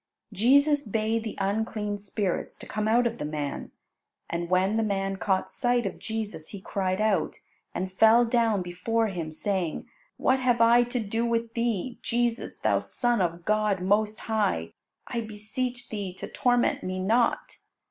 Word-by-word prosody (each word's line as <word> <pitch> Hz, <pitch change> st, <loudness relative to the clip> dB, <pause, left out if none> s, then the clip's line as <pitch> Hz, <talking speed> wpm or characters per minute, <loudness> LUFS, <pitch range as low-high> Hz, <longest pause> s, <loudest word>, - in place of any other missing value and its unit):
Jesus 285 Hz, +8 st, +4 dB
bade 220 Hz, +1 st, 0 dB
the 220 Hz, -, -6 dB
unclean 205 Hz, +1 st, -1 dB
spirits 200 Hz, -1 st, -3 dB
to -, -, -10 dB
come 215 Hz, 0 st, -2 dB
out 240 Hz, +3 st, +4 dB
of 235 Hz, 0 st, -1 dB
the -, -, -3 dB
man. 150 Hz, -1 st, -4 dB, 0.6 s
And 170 Hz, 0 st, -2 dB
when 185 Hz, +3 st, +2 dB
the 225 Hz, -, +2 dB
man 195 Hz, -2 st, -1 dB
caught 190 Hz, -1 st, 0 dB
sight 245 Hz, -1 st, +1 dB
of 195 Hz, -, -4 dB
Jesus, 215 Hz, -8 st, -5 dB
he 200 Hz, -, -8 dB
cried 185 Hz, 0 st, -2 dB
out, 215 Hz, -2 st, +1 dB, 0.4 s
and 185 Hz, +1 st, -2 dB
fell 225 Hz, +4 st, +6 dB
down 230 Hz, -4 st, +2 dB
before 220 Hz, +6 st, 0 dB
Him, 170 Hz, -4 st, -4 dB
saying, 180 Hz, 0 st, -2 dB, 0.3 s
"What 260 Hz, 0 st, +2 dB
have 245 Hz, -2 st, +2 dB
I 230 Hz, +1 st, +6 dB
to 245 Hz, +1 st, -2 dB
do 225 Hz, +1 st, -1 dB
with 230 Hz, -1 st, -1 dB
Thee, 235 Hz, 0 st, -1 dB
Jesus, 240 Hz, 0 st, -1 dB
Thou -, -, +2 dB
Son 240 Hz, -4 st, 0 dB
of 170 Hz, -1 st, -2 dB
God 215 Hz, -2 st, +2 dB
most 210 Hz, +3 st, +1 dB
high? 205 Hz, -, 0 dB, 0.3 s
I 235 Hz, -, -3 dB
beseech 240 Hz, +4 st, -4 dB
Thee 200 Hz, -4 st, -4 dB
to -, -, -6 dB
torment 245 Hz, -1 st, +1 dB
me 185 Hz, 0 st, -3 dB
not." 225 Hz, +6 st, +1 dB
215 Hz, 165 wpm, -27 LUFS, 190-235 Hz, 0.6 s, fell